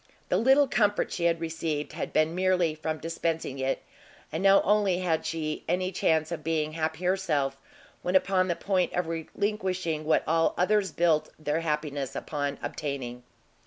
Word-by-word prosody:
the - - +3
little 270 +4 +5
comfort 205 -4 +1
she 170 - -2
had 170 -1 +2
received, 160 -3 -3
had 155 - -4
been 155 +1 +2
merely 180 -3 +2
from 155 0 -3
dispensing 165 -3 -3
it, 135 0 -1 0.5
and 160 - -2
now 195 0 +6
only 205 -3 +3
had 175 -3 0
she 155 -2 -3
any 185 +2 0
chance 160 -3 +1
of 160 -3 -4
being 155 -1 0
happy 160 +2 -3
herself, 160 -8 +1 0.5
when 180 +1 -1
upon 185 -1 +3
the 175 - 0
point 185 -1 0
of 180 - 0
relinquishing 180 0 -2
what 155 - +2
all 165 +1 +2
others 195 0 +2
built 155 -2 +2
their 155 0 -1
happiness 150 -4 -2
upon 145 -2 -3
obtaining! 140 -4 -4
165 Hz, 160 wpm, -28 LUFS, 155-185 Hz, 0.5 s, now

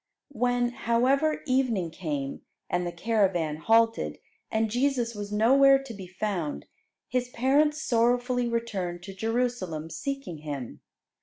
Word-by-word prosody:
When, 245 -2 +1
however, 255 +6 +1
evening 250 - +1
came, 150 -5 -4 0.3
and 175 0 0
the - - -3
caravan 180 -5 +1
halted, 225 +6 +2 0.3
and 220 -1 0
Jesus 245 -1 +1
was 205 -1 -6
nowhere 270 +6 +6
to 260 -4 -8
be 195 -3 -9
found, 175 - -3 0.4
His 250 -1 -1
parents 290 +5 +2
sorrowfully 245 +1 +2
returned 195 -7 -3
to 195 +2 -8
Jerusalem 210 -7 -2
seeking 275 - -4
Him. 145 -5 -6
230 Hz, 125 wpm, -27 LUFS, 180-250 Hz, 0.4 s, nowhere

